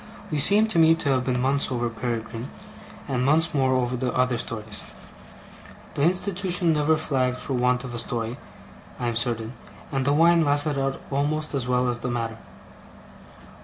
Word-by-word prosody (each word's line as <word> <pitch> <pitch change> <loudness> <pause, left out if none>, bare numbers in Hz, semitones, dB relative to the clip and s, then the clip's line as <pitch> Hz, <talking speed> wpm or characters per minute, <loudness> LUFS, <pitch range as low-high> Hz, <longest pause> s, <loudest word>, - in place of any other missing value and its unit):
We 150 - 0
seem, 205 +9 +6
to 200 - +2
me, 165 0 +6
to 165 -3 -3
have 130 -2 +1
been 125 -1 0
months 135 +2 0
over 120 -1 -1
Peregrine, 115 +1 -5 0.6
and 125 -2 -1
months 160 +5 +3
more 130 -2 +2
over 125 0 0
the 125 0 -2
other 125 -2 +1
stories. 110 -3 -7 1.0
The - - -3
institution 180 0 +2
never 155 +1 +2
flagged 130 -4 -1
for 135 - -5
want 125 0 +1
of 125 -2 -7
a 120 - -2
story, 115 0 -3 0.6
I 120 - -1
am 115 - -3
certain; 115 -1 -1 0.4
and 135 -2 -1
the 140 +2 +2
wine 165 +2 +5
lasted 145 0 +2
out 135 0 -2
almost 150 +3 -1
as 130 -3 -2
well 125 0 +1
as 120 0 -2
the 125 - -4
matter. 115 -2 -3
130 Hz, 175 wpm, -24 LUFS, 120-150 Hz, 1.0 s, seem